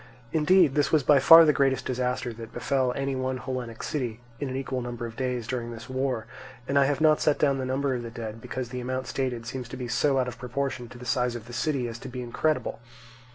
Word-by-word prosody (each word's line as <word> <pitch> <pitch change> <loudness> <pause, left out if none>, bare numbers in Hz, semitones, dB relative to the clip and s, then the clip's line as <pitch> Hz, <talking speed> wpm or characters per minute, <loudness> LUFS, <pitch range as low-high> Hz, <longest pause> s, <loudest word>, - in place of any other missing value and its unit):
Indeed, 160 -1 +5
this 145 0 +1
was 155 -3 +4
by 140 +1 +6
far 165 +4 +9
the 150 - +4
greatest 135 -2 +1
disaster 125 -1 -1
that 115 0 -9
befell 130 -2 0
any 135 0 -1
one 130 0 -2
Hellenic 125 -2 -5
city 120 -6 -3 0.2
in 140 - -3
an 130 - -4
equal 130 -1 -2
number 120 -1 -5
of 115 -1 -7
days 125 -2 -2
during 120 -1 -3
this 115 +2 -9
war; 130 -3 -1 0.4
and 140 0 +3
I 140 - +5
have 145 +2 0
not 155 -1 +5
set 150 - +3
down 140 -2 +2
the 130 - -2
number 135 +1 0
of 125 - -2
the 115 - -6
dead, 115 -1 -7
because 125 0 -5
the 125 0 -5
amount 130 +1 -3
stated 125 -3 -2
seems 125 0 -5 0.2
so 135 +2 +2
out 130 -1 +1
of 125 - -7
proportion 130 -1 -3
to 125 - -11
the 125 - -10
size 125 0 0
of 115 -2 -7
the 120 - -11
city 130 0 0
as 115 0 -7
to 135 - -8
be 125 0 -5
incredible. 150 +3 -1
130 Hz, 240 wpm, -27 LUFS, 120-135 Hz, 0.4 s, far